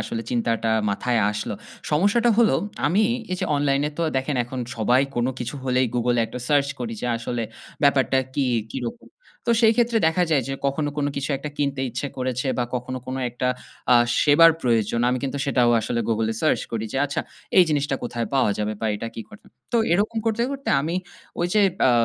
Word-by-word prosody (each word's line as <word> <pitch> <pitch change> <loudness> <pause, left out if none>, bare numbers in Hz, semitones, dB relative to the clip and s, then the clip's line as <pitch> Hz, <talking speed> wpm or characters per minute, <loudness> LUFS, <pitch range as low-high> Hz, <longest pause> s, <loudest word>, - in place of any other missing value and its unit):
আসলে 115 - -4
চিন্তাটা 115 -2 0 0.2
মাথায় 120 +3 0
আসলো। 105 0 -4 0.4
সমস্যাটা 205 +10 +3
হলো 230 - +5 0.3
আমি 190 +8 +3 0.3
এই - - 0
যে - - 0
online 140 -1 +1
এ - - -8
তো - - +1
দেখেন 135 +2 -1
এখন 125 +1 -6 0.2
সবাই 120 +4 +3 0.2
কোন 120 +1 +1
কিছু 120 +2 -4
হলেই 130 0 +2
Google 120 0 +1
এ - - +4
একটা 125 - -7
search 140 -2 +3
করি 115 -2 -3
যে - - -2
আসলে 120 0 -3 0.4
ব্যাপারটা 135 -2 +3 0.2
কি 140 - +1 0.3
কিরকম? 115 -2 -6 0.4
তো - - +2
সেই 220 0 +6
ক্ষেত্রে 235 -1 +3
দেখা 175 +2 +2
যায় 140 -4 +3
যে - - -2
কখনো 145 +2 0
কোনো 145 -1 0
কিছু 140 +2 -2
একটা 150 +1 -6
কিনতে 140 -2 -1
ইচ্ছে 120 +5 -3
করেছে 130 +1 -2
বা 120 - +2
কখনো 125 +1 -3
কোনো 130 +1 -3
একটা 125 +1 -2 0.4
আ - - +8 0.3
সেবার 160 +3 +7
প্রয়োজন। 115 -2 +1
আমি 125 0 +1
কিন্তু 140 +1 -2
সেটাও 125 -3 +3
আসলে 115 +2 -2
Google 110 0 +1
এ - - -7
search 155 - +2
করি 110 -1 -2
যে 135 - -3
আচ্ছা 140 - -2 0.4
এই 180 - +9
জিনিসটা 145 -2 0
কোথায় 120 -1 -3
পাওয়া 130 -5 +3
যাবে 105 0 -1
বা 110 - -1
এটা 115 +2 -4
কী 115 - -5
ঘটে? 215 - -15 0.3
তো - - +3 0.2
এরকম 210 +5 +1
করতে, 225 +1 +1
করতে 275 0 -6
আমি 165 +4 -2 0.5
ওই 175 - +2
যে 210 - +5 0.3
আ - - +5
130 Hz, 205 wpm, -23 LUFS, 120-150 Hz, 0.5 s, এই